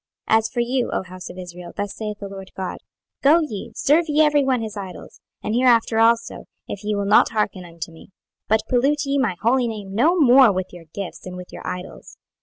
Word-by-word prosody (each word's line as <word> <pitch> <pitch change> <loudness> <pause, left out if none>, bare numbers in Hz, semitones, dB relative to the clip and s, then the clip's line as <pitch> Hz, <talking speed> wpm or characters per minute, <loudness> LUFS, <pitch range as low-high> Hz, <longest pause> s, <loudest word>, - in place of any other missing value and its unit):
26:020:039 220 - +7
As 225 0 -3
for 240 - -4
you, 245 +1 0
O - - -1
house 185 0 -9
of 180 - -10
Israel, 180 -1 -9
thus 205 0 -3
saith 210 -1 -5
the 200 - -7
Lord 195 -1 -9
GOD; 190 -1 -4 0.4
Go 300 +5 +6
ye, 220 -11 -5
serve 315 +4 +3
ye 305 +1 +4
every 295 -1 +3
one 260 -2 +1
his 220 -2 -5
idols, 195 -3 -9 0.2
and 215 - -2
hereafter 235 -2 +3
also, 230 +1 +2 0.2
if 200 - -6
ye 210 0 -1
will 200 0 -1
not 205 +2 +5
hearken 210 -4 -1
unto 170 0 -8
me: 160 - -15 0.4
but 220 +1 +2
pollute 280 +4 +2
ye 275 0 0
my 230 -9 +1
holy 245 +2 +3
name 205 -4 -6
no 315 - +3
more 260 -4 +7
with 185 -1 -4
your 175 -2 -11
gifts, 195 -1 -7
and 180 - -7
with 180 0 -10
your - - -8
idols. 180 0 -7
220 Hz, 220 wpm, -22 LUFS, 190-255 Hz, 0.4 s, 26:020:039